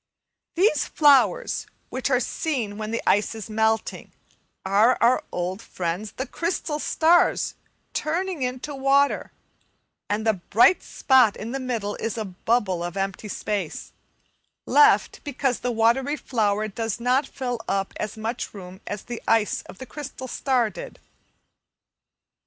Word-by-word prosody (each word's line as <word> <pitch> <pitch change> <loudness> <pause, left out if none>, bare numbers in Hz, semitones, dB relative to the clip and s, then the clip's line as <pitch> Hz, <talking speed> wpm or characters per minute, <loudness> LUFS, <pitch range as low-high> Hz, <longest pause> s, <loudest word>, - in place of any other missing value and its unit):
These 345 -5 +3
flowers, 270 - +3 0.2
which 260 +1 -2
are 255 -2 +3
seen 235 -6 -2
when 215 0 -4
the 230 - -2
ice 205 +2 +2
is 220 0 -7
melting, 220 0 0 0.5
are 210 +6 +4
our 240 +2 +3
old 180 +3 -3
friends 180 +3 -4
the 260 - -4
crystal 330 0 -2
stars 335 +3 +3 0.4
turning 350 +1 -2
into 255 +3 -3
water, 275 +1 +2 0.8
and 210 +2 -1
the 220 - +4
bright 215 - +4
spot 255 -6 +3
in 225 +2 -6
the 270 - -3
middle 230 -6 -2
is 225 +1 -3
a 220 - -2
bubble 190 -1 0
of 175 +2 -5
empty 195 +2 -3
space, 200 -3 -4 0.7
left 435 -1 +4
because 270 -3 -1
the 245 - -1
watery 240 +5 +2
flower 215 -6 0
does 225 +2 -3
not 250 +4 +2
fill 245 -3 -4
up 195 0 -1
as 215 +1 -4
much 225 +1 -4
room 185 0 -10
as 205 -1 -5
the 240 -1 -6
ice 225 -3 +2
of - - -10
the 260 - -8
crystal 265 0 -7
star 250 -4 +1
did. - - -9
230 Hz, 140 wpm, -24 LUFS, 210-270 Hz, 0.8 s, are